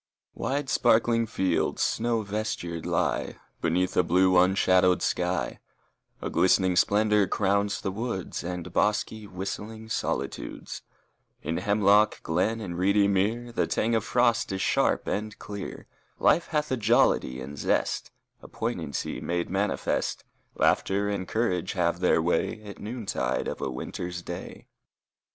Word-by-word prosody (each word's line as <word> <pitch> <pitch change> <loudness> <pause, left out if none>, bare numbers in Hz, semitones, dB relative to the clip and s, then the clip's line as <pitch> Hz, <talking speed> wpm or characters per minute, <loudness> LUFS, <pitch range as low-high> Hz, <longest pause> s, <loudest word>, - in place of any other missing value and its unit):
II - - -10
Wide, 140 +1 -1
sparkling 115 -2 +3
fields 95 -5 0
snow 115 -1 0
vestured 100 -5 -3
lie - - 0 0.3
Beneath 90 +2 +1
a - - +5
blue, 90 +2 +3
unshadowed 90 0 +4
sky; 90 +1 -1 0.6
A - - -2
glistening 95 0 +3
splendor 105 +2 +3
crowns 100 0 +1
the 95 - -2
woods 110 -3 -4
And 90 -1 -5
bosky, 105 +1 0
whistling 105 +4 -6
solitudes; - - -3 0.6
In 80 +2 -2
hemlock 105 +2 +3
glen 90 +8 0
and 90 -4 -5
reedy 100 +2 +4
mere 110 +5 0
The 115 - 0
tang 115 +2 0
of 110 -2 +2
frost 120 -1 +2
is 95 - -2
sharp - - +2
and 105 0 -3
clear; 100 -2 -7 0.3
Life 170 - +3
hath 150 -2 -1
a 130 - +1
jollity 105 - +2
and 70 +3 -7
zest, 70 - 0 0.3
A - - -11
poignancy 70 - -3
made 85 0 -2
manifest; 100 +2 -1 0.3
Laughter 100 +1 +2
and 100 -3 -3
courage 95 -6 -1
have 85 -2 0
their 90 -2 +3
way 105 +5 0
At 105 -1 -10
noontide 105 - -2
of - - -5
a - - -1
winter's 90 +7 -5
day. 85 - -7
100 Hz, 135 wpm, -27 LUFS, 90-110 Hz, 0.6 s, a